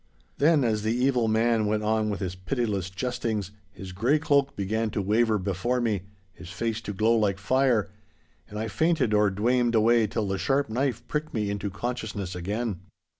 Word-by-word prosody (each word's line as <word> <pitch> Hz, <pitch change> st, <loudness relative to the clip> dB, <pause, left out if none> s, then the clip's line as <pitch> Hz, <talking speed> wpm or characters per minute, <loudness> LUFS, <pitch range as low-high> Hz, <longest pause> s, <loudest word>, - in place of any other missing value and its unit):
Then, 150 Hz, -1 st, +4 dB
as 110 Hz, -3 st, +1 dB
the 110 Hz, +2 st, 0 dB
evil 125 Hz, -2 st, +2 dB
man 110 Hz, 0 st, +2 dB
went 105 Hz, 0 st, 0 dB
on 110 Hz, 0 st, +1 dB
with 100 Hz, -2 st, -3 dB
his 90 Hz, -2 st, -2 dB
pitiless 100 Hz, -1 st, -2 dB
jestings, 110 Hz, -1 st, -3 dB, 0.2 s
his 95 Hz, -2 st, -9 dB
grey 120 Hz, +11 st, +2 dB
cloak 140 Hz, -3 st, +1 dB
began 110 Hz, +3 st, -1 dB
to 105 Hz, -, -3 dB
waver 110 Hz, +3 st, +2 dB
before 100 Hz, +6 st, -1 dB
me, 110 Hz, -5 st, 0 dB, 0.3 s
his 90 Hz, -1 st, -11 dB
face 115 Hz, +3 st, -3 dB
to 105 Hz, -, -5 dB
glow 110 Hz, +4 st, +2 dB
like 105 Hz, -4 st, +1 dB
fire, 120 Hz, 0 st, +2 dB, 0.6 s
and 105 Hz, -, -7 dB
I 110 Hz, +1 st, -2 dB
fainted 155 Hz, -3 st, +1 dB
or 105 Hz, -1 st, +4 dB
dwamed 120 Hz, +4 st, +1 dB
away 115 Hz, 0 st, +4 dB
till 105 Hz, 0 st, -2 dB
the 95 Hz, -1 st, -2 dB
sharp 140 Hz, -1 st, +1 dB
knife 125 Hz, 0 st, -1 dB
pricked 150 Hz, -2 st, -3 dB
me 105 Hz, -2 st, -1 dB
into 100 Hz, 0 st, -3 dB
consciousness 105 Hz, -3 st, -4 dB
again. 100 Hz, +3 st, -3 dB
110 Hz, 180 wpm, -26 LUFS, 100-120 Hz, 0.6 s, Then